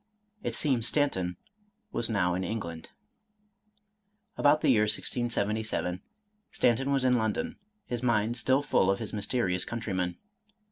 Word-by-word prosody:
It - - -3
seems 125 -6 +2
Stanton 95 - +1 0.5
was 120 - +1
now 90 -5 +1
in 90 +1 -2
England. 85 -7 -5 1.5
About 145 +1 +4
the - - +4
year 110 -4 +4
1677, 105 -5 -1 0.5
Stanton 130 +3 +2
was 135 -2 +1
in 125 -1 +4
London, 220 - -2 0.3
his 120 -1 -4
mind 115 -2 +1
still 130 +4 +2
full 95 -9 +2
of 95 - +2
his 110 - -6
mysterious 100 -3 0
countryman. 95 -7 -3
110 Hz, 130 wpm, -29 LUFS, 95-125 Hz, 1.5 s, About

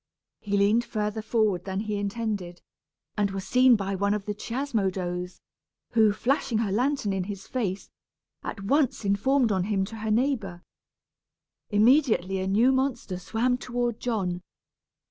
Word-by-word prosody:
He 205 -1 -1
leaned 210 +4 +3
further 215 -1 -3
forward 215 -5 0
than 190 0 -2
he 210 -1 -3
intended, 200 -4 -3 0.5
and 205 -1 +1
was 195 0 -5
seen 250 +1 +6
by 195 -2 -2
one 200 +2 +1
of 205 -2 -5
the 210 - -2
Chiasmodos, 190 -7 -3 0.5
who, 220 -2 +5
flashing 245 +1 0
her 220 -3 0
lantern 250 -1 0
in 190 -2 -2
his 195 -1 -7
face, 205 -7 -3 0.5
at 195 - -6
once 270 0 +1
informed 230 +5 +2
on 185 -2 +1
him 195 -2 0
to 225 +3 -9
her 220 0 -4
neighbor. 215 -7 0 1.1
Immediately 215 - +3
a 190 - -2
new 225 +7 +4
monster 260 -8 -1
swam 245 +6 0
toward 240 -2 -2
John. 190 -7 -2
210 Hz, 145 wpm, -26 LUFS, 195-240 Hz, 1.1 s, seen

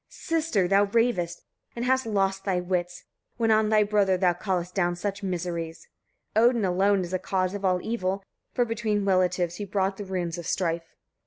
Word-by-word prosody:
Sister! 315 - 0
thou 200 +2 +4
ravest, 200 -6 0 0.3
and 235 +1 -3
hast 260 -1 +2
lost 195 -2 0
thy 190 -3 0
wits, 180 0 -2 0.3
when 225 -1 +2
on 215 0 +3
thy 215 -1 +5
brother 205 -2 +2
thou 180 -1 +3
callest 180 -1 -2
down 175 -2 +1
such 195 +2 -4
miseries. 170 -3 -4 0.5
Odin 235 -1 +4
alone 190 +2 +2
is 175 +1 -6
cause 185 -1 -1
of 200 -1 -5
all 185 -1 +3
the - - -8
evil; 195 -4 -1 0.3
for 245 - +1
between 215 -3 -1
relatives 180 -2 +1
he 210 - -4
brought 195 -1 -1
the 205 - -6
runes 175 -3 -3
of 170 - -7
strife. 165 -2 -2
195 Hz, 180 wpm, -26 LUFS, 180-210 Hz, 0.5 s, thy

